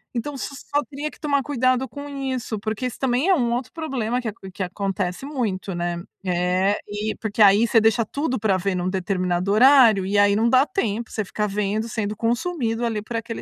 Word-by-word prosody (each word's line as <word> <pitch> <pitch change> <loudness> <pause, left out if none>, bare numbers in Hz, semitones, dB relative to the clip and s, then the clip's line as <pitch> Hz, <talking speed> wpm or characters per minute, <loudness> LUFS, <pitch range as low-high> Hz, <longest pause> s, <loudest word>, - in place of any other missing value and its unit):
Então 280 +5 -3
você - - -4
só 290 +1 -2
teria 295 +1 -4
que - - -18
tomar 285 -3 +1
cuidado 255 -2 +1
com 285 0 -8
isso, 260 -5 -3
porque 220 +3 -3
isso 245 - -7
também 265 +6 +1
é 380 - +6
um 240 -6 0
outro 245 +1 -2
um - - -63
problema 250 -6 -1
que 240 - -5
aco 195 -3 -10
que 190 - -3
acontece 190 +1 -3
muito, 215 -10 -3
né? 175 0 -2 0.2
É, 180 +2 +1
e 210 +1 -3
porque, 220 0 -2
aí, 205 +3 +6
você 225 - +5
deixa 225 +1 +3
tudo 270 +1 -2
pra 200 -3 +2
ver 195 +1 -1
num 180 0 -1
determinado 185 -1 -1
horário, 230 -3 +6
e 200 +1 0
aí, 205 0 +5
não 225 +3 +2
dá 260 +2 +5
tempo. 235 - -2
Você 215 - -2
ficar 210 +3 -2
vendo, 210 +2 -1
sendo 215 -2 -3
consumido, 235 -1 -1
ali, 220 -2 -1
por 230 +2 -4
aquele 230 0 -5
225 Hz, 215 wpm, -23 LUFS, 200-255 Hz, 0.2 s, é